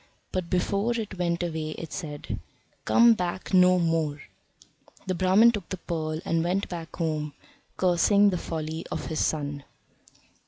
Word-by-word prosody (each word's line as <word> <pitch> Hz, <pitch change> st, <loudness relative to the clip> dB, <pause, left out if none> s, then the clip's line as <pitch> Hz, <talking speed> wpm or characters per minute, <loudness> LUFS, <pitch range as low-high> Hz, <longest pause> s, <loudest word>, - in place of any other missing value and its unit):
But 185 Hz, -2 st, -3 dB
before 200 Hz, +5 st, +1 dB
it 200 Hz, -4 st, -6 dB
went 170 Hz, 0 st, 0 dB
away 160 Hz, -2 st, -3 dB
it 165 Hz, -, -7 dB
said: 150 Hz, -5 st, -5 dB, 0.5 s
"Come 235 Hz, 0 st, +6 dB
back 180 Hz, -1 st, -4 dB
no 180 Hz, 0 st, +6 dB
more." 165 Hz, -3 st, 0 dB, 0.9 s
The 185 Hz, -, -1 dB
Brahman 190 Hz, +6 st, +5 dB
took 205 Hz, -6 st, -6 dB
the 190 Hz, -, -4 dB
pearl, 155 Hz, -3 st, -3 dB
and 165 Hz, 0 st, +1 dB
went 185 Hz, +3 st, 0 dB
back 165 Hz, -2 st, -7 dB
home, 155 Hz, -3 st, -2 dB, 0.4 s
cursing 200 Hz, +3 st, +4 dB
the 180 Hz, -, -1 dB
folly 160 Hz, 0 st, -4 dB
of -, -, -3 dB
his 160 Hz, -, -3 dB
son. 145 Hz, -2 st, -2 dB
175 Hz, 150 wpm, -27 LUFS, 160-185 Hz, 0.9 s, Come